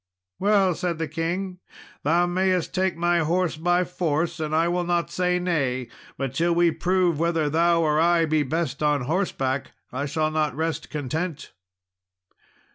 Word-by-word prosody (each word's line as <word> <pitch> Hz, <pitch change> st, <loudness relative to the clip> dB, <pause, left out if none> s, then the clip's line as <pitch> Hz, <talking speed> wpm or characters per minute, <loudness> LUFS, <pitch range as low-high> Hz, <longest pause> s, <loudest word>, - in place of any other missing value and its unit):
"Well," 195 Hz, -2 st, +3 dB
said 175 Hz, 0 st, -2 dB
the 160 Hz, 0 st, -2 dB
king, 175 Hz, +4 st, -3 dB, 0.4 s
"thou 170 Hz, +4 st, +3 dB
mayest 185 Hz, 0 st, 0 dB
take 185 Hz, -2 st, 0 dB
my 175 Hz, 0 st, +2 dB
horse 170 Hz, +2 st, 0 dB
by 175 Hz, +3 st, +2 dB
force, 170 Hz, -1 st, -1 dB
and 155 Hz, 0 st, -2 dB
I 165 Hz, +1 st, +3 dB
will 175 Hz, +1 st, 0 dB
not 175 Hz, -1 st, -1 dB
say 180 Hz, 0 st, +1 dB
nay; 135 Hz, -9 st, -1 dB, 0.3 s
but 135 Hz, -2 st, -3 dB
till 170 Hz, +4 st, +1 dB
we 170 Hz, -1 st, +4 dB
prove 180 Hz, -2 st, +1 dB
whether 165 Hz, -3 st, +1 dB
thou 165 Hz, +1 st, +3 dB
or 155 Hz, -1 st, +2 dB
I 170 Hz, 0 st, +4 dB
be 155 Hz, -1 st, +1 dB
best 145 Hz, -1 st, -2 dB
on 150 Hz, -2 st, +2 dB
horseback, 135 Hz, -3 st, -1 dB, 0.2 s
I 140 Hz, +3 st, -2 dB
shall 155 Hz, +2 st, 0 dB
not 155 Hz, -3 st, 0 dB
rest 160 Hz, +1 st, -3 dB
content." 155 Hz, +2 st, -4 dB
165 Hz, 160 wpm, -24 LUFS, 155-175 Hz, 0.4 s, we